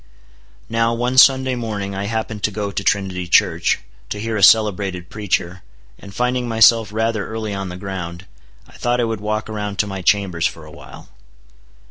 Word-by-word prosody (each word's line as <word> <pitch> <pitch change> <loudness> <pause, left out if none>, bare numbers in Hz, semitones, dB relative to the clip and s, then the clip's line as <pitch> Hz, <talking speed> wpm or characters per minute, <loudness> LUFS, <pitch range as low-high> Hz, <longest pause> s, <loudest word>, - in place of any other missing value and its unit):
Now, 115 +1 +1
one 125 +2 +2
Sunday 130 0 +5
morning 105 -5 -4
I 95 +1 -3
happened 110 0 -3
to - - +1
go 105 -1 -4
to 100 - -3
Trinity 95 -3 -1
Church, - - +3 0.3
to 105 - -4
hear 110 +1 -3
a 105 - -1
celebrated 95 -4 +3
preacher, 95 -3 -2 0.4
and 100 - -12
finding 125 +2 -1
myself 115 -1 +4
rather 110 -1 -1
early 110 -2 -4
on 95 -1 -4
the 90 - -7
ground, 90 -2 -6 0.4
I - - -19
thought 120 0 0
I - - +2
would 115 -2 -3
walk 110 +1 -2
around 105 -2 -5
to 105 - +1
my 95 -2 -6
chambers 90 -3 +1
for 80 -1 -10
a 75 - -13
while. - - -13
105 Hz, 180 wpm, -19 LUFS, 95-115 Hz, 0.4 s, Sunday